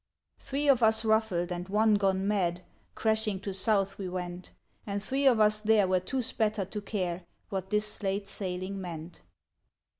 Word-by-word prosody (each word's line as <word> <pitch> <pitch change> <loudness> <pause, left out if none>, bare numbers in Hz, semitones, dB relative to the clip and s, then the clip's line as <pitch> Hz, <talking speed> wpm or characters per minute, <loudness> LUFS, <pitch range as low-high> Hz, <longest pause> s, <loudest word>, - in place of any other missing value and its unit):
Three 280 +2 -2
of 265 -4 +5
us 220 0 +4
rufBed 220 -6 +1
and 180 +1 -4
one 215 +2 +3
gone 195 -1 +1
mad. 180 -4 0 0.3
Crashing 220 -3 0
to 200 -1 -4
south 195 0 +1
we 190 -2 -4
went; 180 0 -5 0.4
And 200 0 -2
three 270 +4 +1
of 245 -4 +5
us 215 0 +4
there 215 -2 +4
were 185 0 +2
too 255 +8 -2
spattered 215 -4 -1
to 210 - -4
care 185 -4 -3 0.3
What 190 -2 -4
this 210 +1 0
late 200 0 -2
sailing 190 0 -4
meant. 165 -1 -8
200 Hz, 170 wpm, -29 LUFS, 185-220 Hz, 0.4 s, of